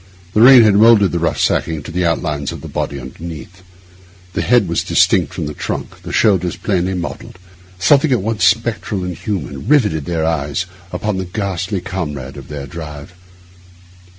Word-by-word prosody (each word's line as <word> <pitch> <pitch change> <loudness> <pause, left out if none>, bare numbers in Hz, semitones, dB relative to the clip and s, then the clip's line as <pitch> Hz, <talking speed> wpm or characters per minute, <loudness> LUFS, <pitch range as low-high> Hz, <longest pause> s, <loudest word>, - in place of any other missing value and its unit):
The 105 - +3
rain 125 0 +9
had 105 -2 +5
moulded 105 -2 +5
the 85 - -1
rough 85 - -1
sacking 80 -3 0
to - - -8
the 90 +1 0
outlines 75 -3 -2
of - - -8
the - - -8
body 70 - -3
underneath; 80 +6 -9 0.7
the - - -1
head 120 -4 +3
was 85 - -1
distinct - - +2
from - - -4
the 75 - -5
trunk, - - -5
the - - -8
shoulders 90 -5 +2
plainly 95 -1 -1
modelled; 90 0 -6 0.4
something 140 - +4
at 120 -7 +2
once 110 0 -1
spectral 105 -4 +1
and 90 -1 -4
human 70 - -5
riveted 105 - +2
their 80 -2 -1
eyes 80 +1 -1 0.3
upon 100 +2 -2
the 95 - -3
ghastly 95 0 -3
comrade 75 -8 -5
of - - -10
their 70 -2 -6
drive. 75 +1 -9
90 Hz, 175 wpm, -17 LUFS, 80-105 Hz, 0.7 s, rain